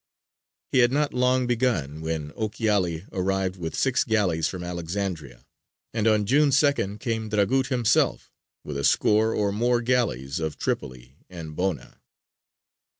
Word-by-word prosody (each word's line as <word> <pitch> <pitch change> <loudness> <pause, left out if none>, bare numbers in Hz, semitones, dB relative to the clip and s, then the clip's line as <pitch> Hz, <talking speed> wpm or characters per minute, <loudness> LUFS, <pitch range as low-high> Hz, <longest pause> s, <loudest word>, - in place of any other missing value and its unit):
He 130 - +3
had 120 0 +5
not 145 +1 0
long 125 0 +2
begun 110 - -1
when 80 -2 -3
Ochiali 105 -6 -1
arrived 95 0 -1
with 80 -3 -5
six 135 -2 +2
galleys 90 -8 +1
from 90 -2 -5
Alexandria, 85 -5 -5 0.5
and 110 -1 0
on 105 -1 +3
June 145 +6 +4
2nd 135 -8 +1
came 110 -2 -3
Dragut 115 +6 +1
himself 125 -5 +1 0.3
with 70 -2 -5
a - - -3
score 110 +9 +3
or 100 -1 +1
more 120 +4 +1
galleys 110 - 0
of 80 -2 -3
Tripoli 65 +2 -4
and 80 -4 -8
Bona. 90 -8 -3
100 Hz, 140 wpm, -25 LUFS, 80-120 Hz, 0.5 s, had